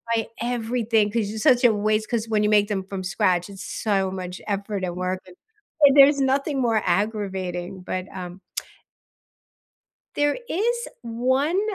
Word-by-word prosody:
like, 225 Hz, -1 st, -1 dB
everything, 230 Hz, -3 st, 0 dB
'cause 215 Hz, -2 st, -1 dB
it's 215 Hz, 0 st, -4 dB
such 255 Hz, -4 st, +5 dB
a 240 Hz, -3 st, +6 dB
waste, 215 Hz, +1 st, 0 dB
'cause 230 Hz, -3 st, -1 dB
when 215 Hz, -1 st, +2 dB
you 210 Hz, -, +2 dB
make 205 Hz, -1 st, +4 dB
them 200 Hz, -3 st, -2 dB
from 190 Hz, 0 st, -6 dB
scratch, 185 Hz, -1 st, +1 dB
it's 195 Hz, -1 st, -9 dB
so 195 Hz, -3 st, -1 dB
much 185 Hz, -1 st, -6 dB
effort, 200 Hz, -1 st, -3 dB
and 175 Hz, -1 st, -2 dB
work, 185 Hz, +1 st, -2 dB
and 180 Hz, -, -14 dB, 0.5 s
and 280 Hz, -1 st, +7 dB
there's 280 Hz, +1 st, +7 dB
nothing 275 Hz, +1 st, +1 dB
more 225 Hz, -3 st, +2 dB
aggravating, 190 Hz, -2 st, -2 dB
but, 185 Hz, 0 st, -4 dB
um 180 Hz, 0 st, -7 dB, 1.8 s
there 290 Hz, +5 st, +1 dB
is 475 Hz, +6 st, -1 dB
1, 260 Hz, +9 st, +1 dB
215 Hz, 160 wpm, -24 LUFS, 190-245 Hz, 1.8 s, and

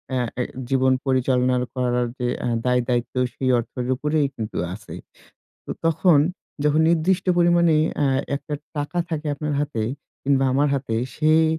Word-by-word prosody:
আ -, -, +1 dB, 0.2 s
এ -, -, +2 dB, 0.3 s
জীবন 130 Hz, -1 st, +3 dB
পরিচালনা 130 Hz, -1 st, +2 dB, 0.2 s
করার 125 Hz, -1 st, 0 dB
যে 125 Hz, -, 0 dB
এ্যা -, -, -1 dB, 0.2 s
দায় 125 Hz, 0 st, +3 dB
দায়িত্ব 120 Hz, -1 st, -1 dB, 0.2 s
সেই 130 Hz, -1 st, -1 dB
অর্থের 125 Hz, +1 st, -4 dB
উপরেই 150 Hz, +1 st, +1 dB
কিন্তু 110 Hz, -1 st, -5 dB, 0.2 s
আছে। 105 Hz, -, -9 dB, 0.7 s
তো -, -, -8 dB
তখন 165 Hz, -1 st, +4 dB, 0.5 s
যখন 150 Hz, +1 st, +3 dB
নির্দিষ্ট 175 Hz, +3 st, +2 dB
পরিমাণে 170 Hz, -2 st, +4 dB, 0.2 s
এ্যা 145 Hz, -, +2 dB, 0.3 s
একটা 150 Hz, +1 st, -6 dB, 0.2 s
টাকা 150 Hz, +4 st, -2 dB
থাকে 155 Hz, -2 st, -3 dB
আপনার 150 Hz, +1 st, -3 dB
হাতে 140 Hz, -7 st, -2 dB, 0.4 s
কিংবা 135 Hz, -1 st, +2 dB
আমার 145 Hz, +2 st, +3 dB
হাতে 130 Hz, -4 st, -2 dB, 0.2 s
সেই 155 Hz, +1 st, +4 dB
140 Hz, 150 wpm, -23 LUFS, 125-155 Hz, 0.7 s, তখন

